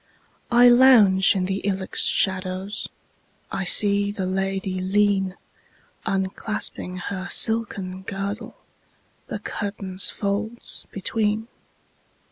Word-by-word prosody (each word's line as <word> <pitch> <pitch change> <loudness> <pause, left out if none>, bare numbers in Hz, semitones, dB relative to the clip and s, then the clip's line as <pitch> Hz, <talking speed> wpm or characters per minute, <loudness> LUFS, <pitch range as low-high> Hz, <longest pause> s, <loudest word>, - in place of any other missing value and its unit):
I 240 0 +6
lounge 235 -7 +6
in 185 -1 0
the 190 +1 -2
ilex 190 -1 0
shadows,I 190 0 -3
see 200 +2 +3
the 195 -2 -4
lady 190 0 -2
lean, 195 -1 +1 0.7
Unclasping 190 -1 -3
her 185 +1 -5
silken 200 -5 0
girdle, 195 +2 -5 0.7
The - - -4
curtain's 195 -2 -2
folds 215 +3 -4
between. 215 +3 -1
195 Hz, 90 wpm, -23 LUFS, 190-210 Hz, 0.7 s, I